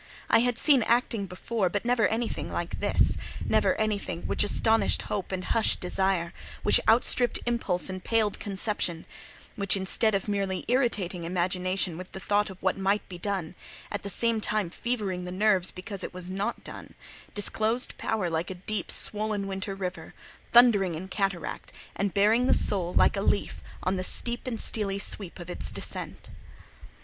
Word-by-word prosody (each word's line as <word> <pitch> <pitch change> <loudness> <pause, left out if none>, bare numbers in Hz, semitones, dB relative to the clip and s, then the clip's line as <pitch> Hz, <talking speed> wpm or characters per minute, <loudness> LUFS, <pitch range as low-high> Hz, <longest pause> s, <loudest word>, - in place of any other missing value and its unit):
I - - +6
had 245 0 +1
seen 280 -2 +4
acting 230 -3 +1
before, 185 +2 -2
but 205 +5 -3
never 240 -4 +3
anything 225 +3 -2
like - - -4
this: - - +2 0.3
never - - +2
anything 210 -5 -2
which - - +1
astonished 220 +2 +3
Hope 195 -3 -4
and 185 -1 -3
hushed 225 - +2
Desire; 180 -1 0 0.3
which - - +5
outstripped 240 +1 +3
Impulse 230 -7 +1
and 185 -1 -5
paled 220 -3 +1
Conception; 195 -4 -2 0.5
which, 200 -1 +2
instead 200 +3 +1
of 195 - -2
merely 195 -2 -1
irritating 215 -9 0
imagination 180 0 0
with 185 - -10
the - - -6
thought 205 +2 +1
of 190 -1 -12
what - - 0
might 195 +2 0
be 180 -2 -8
done, 190 -4 -3 0.4
at 205 - -3
the 200 - -5
same 230 +1 +3
time 210 -5 0
fevering 200 -7 -3
the 180 - -5
nerves 190 -1 +2
because 190 +1 -6
it - - -7
was 180 0 -5
not 195 +2 -3
done, - - -10 0.4
disclosed 220 +4 +1
power 215 -5 -1
like 165 +1 -2
a 190 - -5
deep, 195 +1 -4
swollen 210 -1 0
winter 195 +1 -4
river, 185 -1 -6 0.4
thundering 210 -8 +6
in 185 +4 -6
cataract, 195 -3 -3 0.2
and 200 -1 -1
bearing 220 +5 +4
the - - +5
soul, 180 -3 +1
like - - +3
a 195 - -1
leaf, 200 - 0 0.2
on 185 +1 0
the 185 - -2
steep 240 +6 +1
and 230 -3 -3
steelly 200 -3 0
sweep 200 -2 -1
of 175 -2 -9
its 180 - -3
descent. - - -5
200 Hz, 170 wpm, -27 LUFS, 185-220 Hz, 0.5 s, I